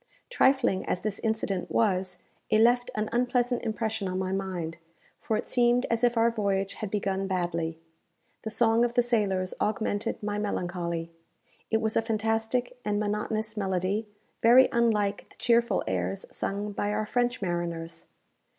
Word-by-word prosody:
Trifling 265 - +3
as 180 - -1
this 205 -1 -3
incident 220 -4 -1
was, 185 -4 +1 0.3
it 215 - +4
left 245 +2 +4
an 215 0 -1
unpleasant 245 0 +1
impression 220 -2 -2
on 185 0 -2
my 185 0 -1
mind; 185 -4 -3 0.4
for 220 - -1
it - - -4
seemed 245 0 +3
as 230 +1 +1
if 240 -1 +3
our 230 +1 +4
voyage 200 -3 -1
had 215 - -5
begun 195 -1 -1
badly. 170 -3 -1 0.6
The 220 - -4
song 225 +1 +3
of 240 0 0
the 245 - +4
sailors 200 -6 0
augmented 210 0 -1
my 205 0 -1
melancholy. 175 -4 -3 0.6
It 220 0 +1
was 220 0 0
a - - +4
fantastic 225 +2 -1
and 205 -1 0
monotonous 215 +1 -2
melody, 195 +1 -1 0.3
very 245 +3 +7
unlike 210 -4 +1
the - - -17
cheerful 235 0 +2
airs 95 +1 -2
sung 205 +1 -2
by 205 +1 -1
our 215 +1 -1
French 245 +2 0
mariners. 170 -3 -3
210 Hz, 155 wpm, -28 LUFS, 190-230 Hz, 0.6 s, very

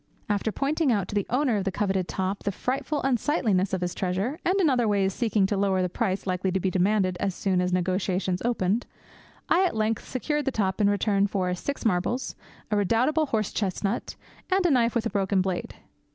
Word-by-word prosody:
After 205 +1 0
pointing 285 +3 +1
out 200 -5 0
to - - -6
the 205 -2 0
owner 255 -2 +2
of 200 - -1
the 195 - -1
coveted 190 -2 -1
top 190 +1 -2
the 200 - -1
frightful 270 +8 -2
unsightliness 235 - +1
of 190 -1 -1
his 180 -1 -2
treasure, 195 - -2
and 375 +3 +2
in 360 - +4
other 245 -5 +2
ways 195 -2 +1
seeking 220 -4 +1
to 205 - 0
lower 195 -1 +1
the 180 - 0
price 195 0 -2
likely 185 0 -1
to 190 - +1
be 190 0 0
demanded 185 0 +1
as 195 -2 -1
soon 185 -2 +1
as 180 0 0
negotiations 185 0 0
opened, 230 -2 0 0.6
I 365 - +4
at 365 - 0
length 220 0 -1
secured 295 +3 -1
the 270 - +1
top 195 -3 -1
in 200 - +4
return 205 -1 +2
for 185 -3 -1
six 275 +11 -4
marbles, 220 +5 0 0.4
a 210 - +2
redoubtable 250 - +2
horse 215 -5 -1
chestnut, 200 +2 -2 0.3
and 380 -1 +2
a 345 - +4
knife 240 -3 +2
with 235 -1 0
a 230 - -1
broken 195 -1 +1
blade. 185 -1 -2
205 Hz, 210 wpm, -26 LUFS, 190-245 Hz, 0.6 s, in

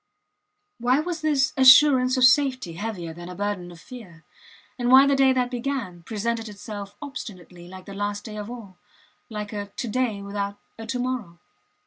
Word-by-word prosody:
Why 250 +3 +2
was 335 +1 -3
this 290 -4 +1
assurance 260 -1 +7
of 255 - +2
safety 255 - +3
heavier 175 -3 -5
than 175 +2 -9
a 180 - -8
burden 200 -2 -3
of 170 - -13
fear, 180 -8 -12 0.6
and 245 0 0
why 265 +2 +8
the 280 0 +3
day 270 -1 +5
that 250 -1 0
began 240 -8 -4
presented 225 +3 -3
itself 205 -1 -8
obstinately 180 - -9
like 185 0 -11
the 200 - -9
last 205 +1 -3
day 215 -2 -8
of 210 +1 -6
all 210 -7 -10 0.5
like 210 -1 -6
a 205 -1 -4
to 205 +4 -6
day 220 -3 -1
without 200 0 -4 0.2
a 225 - -7
to 250 - -2
morrow? 245 -9 -4
220 Hz, 175 wpm, -24 LUFS, 200-255 Hz, 0.6 s, why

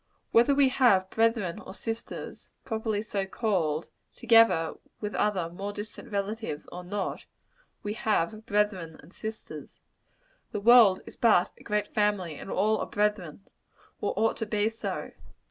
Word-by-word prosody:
Whether 240 +5 +5
we 275 -1 +5
have 200 -8 +3
brethren 225 -6 +1
or 190 - -10
sisters, 225 +1 -6 0.2
properly 220 -2 -2
so 200 -3 -3
called, 175 -8 -1 0.3
together 225 -9 +4 0.3
with 210 -1 -4
other 195 -5 0
more 195 +4 -5
distant 205 +2 -8
relatives, 200 -5 -3
or 180 - -7
not, 195 +1 -4 0.6
we 205 - -2
have 215 0 -1
brethren 200 -6 0
and 170 +6 -17
sisters. 220 0 -8 0.7
The 210 - -1
world 220 -3 +7
is - - -11
but 215 -7 +4
a - - -15
great 210 0 -2
family; 205 -6 +1
and 150 - -9
all 215 +3 +1
are - - -3
brethren, 205 -4 -1 0.5
or - - -2
ought 225 +1 +2
to 225 - -3
be 210 +1 +1
so. 225 0 -5
210 Hz, 145 wpm, -28 LUFS, 190-225 Hz, 0.7 s, world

